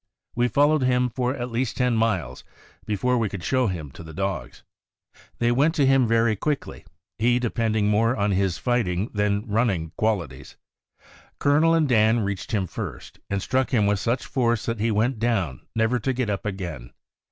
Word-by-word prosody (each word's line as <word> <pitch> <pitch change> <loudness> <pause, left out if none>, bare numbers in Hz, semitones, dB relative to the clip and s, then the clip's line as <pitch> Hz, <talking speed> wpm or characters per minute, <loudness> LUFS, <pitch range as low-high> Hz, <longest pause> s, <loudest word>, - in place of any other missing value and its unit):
We 120 +1 +2
fol 145 +4 +3
lowed 155 -2 +2
him 125 -1 +2
for 125 +2 -1
at 125 -2 -5
least 120 0 -2
ten 125 -2 +2
miles 95 - -1 0.4
before 120 +4 +1
we 110 -3 0
could 95 -3 -7
show 130 +5 +1
him 80 -7 -4
to - - -12
the 80 -2 -10
dogs. 95 -10 -4 0.7
They 120 0 +2
went 145 +7 +2
to 145 -4 +3
him 135 -2 +4
very 115 -1 +2
quickly, 145 +7 -3 0.3
he 120 +2 +3
depending 115 -3 0
more 115 +4 +2
on 100 -2 0
his 95 -2 +1
fighting 110 -5 -1
than 105 0 0
running 100 -7 0
qualities. 95 - -2 0.8
Colonel 155 +4 +3
and 160 -2 +2
Dan 110 -1 +3
reached 100 +5 -4
him 105 -4 0
first, - - -7
and 100 -1 -2
struck 130 +1 0
him 110 -6 +2
with 100 -1 +1
such 120 +7 -1
force 120 -4 0
that 115 -2 -2
he 115 +2 +1
went 110 +3 0
down 100 - -1
never 110 +2 +1
to 130 +4 -1
get 125 -4 -1
up 100 +1 -3
again. 85 -11 -6
115 Hz, 185 wpm, -24 LUFS, 100-125 Hz, 0.8 s, him